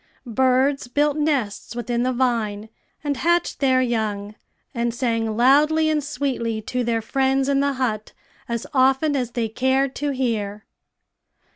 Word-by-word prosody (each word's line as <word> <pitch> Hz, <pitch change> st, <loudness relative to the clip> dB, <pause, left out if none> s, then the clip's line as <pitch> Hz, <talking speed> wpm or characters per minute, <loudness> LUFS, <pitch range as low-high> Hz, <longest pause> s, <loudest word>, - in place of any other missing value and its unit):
Birds 260 Hz, +3 st, +1 dB
built 290 Hz, +3 st, +1 dB
nests 280 Hz, -9 st, -1 dB
within 240 Hz, 0 st, -2 dB
the 255 Hz, +1 st, +1 dB
vine, 225 Hz, -4 st, -1 dB, 0.3 s
and 285 Hz, -2 st, -1 dB
hatched 345 Hz, +4 st, +1 dB
their 260 Hz, -2 st, +3 dB
young, 215 Hz, -4 st, -2 dB, 0.4 s
and 235 Hz, 0 st, -1 dB
sang 230 Hz, -3 st, -1 dB
loudly 300 Hz, +5 st, +4 dB
and 300 Hz, -1 st, 0 dB
sweetly 260 Hz, -6 st, -2 dB
to 250 Hz, +3 st, -3 dB
their 230 Hz, -1 st, -1 dB
friends 270 Hz, +2 st, +1 dB
in 280 Hz, -1 st, +2 dB
the 280 Hz, 0 st, +1 dB
hut 225 Hz, -5 st, -2 dB, 0.4 s
as 235 Hz, -1 st, -2 dB
often 270 Hz, +3 st, +3 dB
as 245 Hz, -3 st, -2 dB
they 235 Hz, -2 st, -1 dB
cared 260 Hz, +4 st, +1 dB
to 290 Hz, -, -2 dB
hear. 220 Hz, -6 st, -2 dB
255 Hz, 145 wpm, -22 LUFS, 230-275 Hz, 0.4 s, loudly